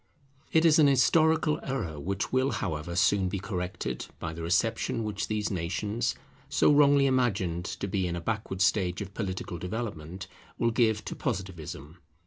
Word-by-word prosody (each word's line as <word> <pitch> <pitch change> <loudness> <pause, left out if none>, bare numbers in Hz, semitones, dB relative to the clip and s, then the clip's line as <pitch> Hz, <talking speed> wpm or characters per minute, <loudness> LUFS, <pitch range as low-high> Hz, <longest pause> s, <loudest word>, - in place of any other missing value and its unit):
It 160 +1 +4
is 160 -1 +6
an 150 - +7
historical 155 +3 +3
error 100 - -3
which 95 - -3
will, 130 +1 +2
however, 85 -1 -3
soon 95 +1 +3
be 100 - -2
corrected 90 -1 -4
by 80 0 -5
the 85 - -7
reception 110 +6 0
which 105 -1 -3
these 105 -1 -1
nations, 100 +6 -1 0.3
so - - +4
wrongly 145 -1 +5
imagined 105 -10 +1
to 100 - -4
be 95 -1 0
in 85 - -2
a - - -3
backward 100 0 -3
stage 95 -3 +1
of 100 0 -11
political 95 -4 -4
development, 90 -3 -5 0.3
will 115 - +2
give 110 -2 +2
to - - -5
Positivism. 85 - -5
100 Hz, 160 wpm, -28 LUFS, 90-120 Hz, 0.3 s, an